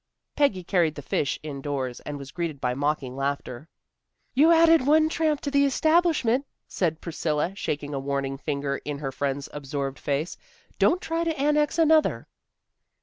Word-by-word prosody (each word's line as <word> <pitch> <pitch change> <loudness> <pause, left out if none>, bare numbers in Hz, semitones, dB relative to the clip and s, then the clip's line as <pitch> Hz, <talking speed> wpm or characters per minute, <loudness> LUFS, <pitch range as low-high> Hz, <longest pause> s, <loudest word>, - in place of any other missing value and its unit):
Peggy 215 -11 +2
carried 170 -4 +1
the 145 - -8
fish 140 - -1
indoors, 140 -4 -4
and 145 -1 -6
was 140 -1 -9
greeted 165 -4 -4
by 125 -1 0
mocking 140 -1 -1
laughter. 140 0 -3 0.7
"You've 300 +6 +5
added 330 -4 +5
one 310 +1 +5
tramp 310 -3 0
to 285 - -3
the 280 0 +4
establishment," 285 -3 +2 0.2
said 165 -4 -1
Priscilla, 160 +1 -1
shaking 145 -6 -4
a 140 - -2
warning 135 0 -2
finger 140 -2 -2
in 145 -1 -5
her 140 -2 -4
friend's 140 +1 -2
absorbed 140 -1 -4
face; 145 +4 -2 0.4
"don't 360 +2 +3
try 330 +1 -1
to 325 -4 -2
annex 295 +2 +2
another." 320 -1 +3
155 Hz, 155 wpm, -26 LUFS, -, 0.7 s, You've